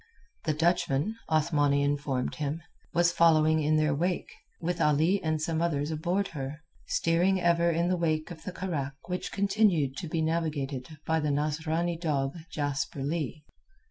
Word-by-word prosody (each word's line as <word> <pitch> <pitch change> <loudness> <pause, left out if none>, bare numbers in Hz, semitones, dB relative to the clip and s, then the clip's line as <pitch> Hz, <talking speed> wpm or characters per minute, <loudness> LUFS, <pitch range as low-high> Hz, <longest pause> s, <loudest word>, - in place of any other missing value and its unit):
The 155 - +2
Dutchman, 165 +2 +1
Othmani 145 -3 +2
informed 140 -3 -1
him, 150 +3 -2 0.3
was 175 0 +3
following 160 -2 +4
in 155 +1 +2
their 155 -1 +2
wake, 175 +5 -1 0.3
with 175 +1 -2
Ali 160 +6 +3
and 155 -1 0
some 160 +1 -1
others 150 -3 0
aboard 180 +6 0
her, 145 0 -6 0.2
steering 175 +3 +2
ever 170 -1 +3
in 170 +1 +1
the 180 0 +1
wake 155 -1 0
of 160 -2 -9
the 185 - -5
carack 150 -8 -3
which 180 0 -3
continued 195 -9 +2
to 175 - -4
be 160 +1 -1
navigated 150 -5 -1 0.2
by 160 +1 +2
the 150 -1 0
Nasrani 160 +4 0
dog, 140 -4 -1
Jasper 140 -2 -2
Leigh. 150 0 -3
160 Hz, 155 wpm, -29 LUFS, 145-170 Hz, 0.3 s, following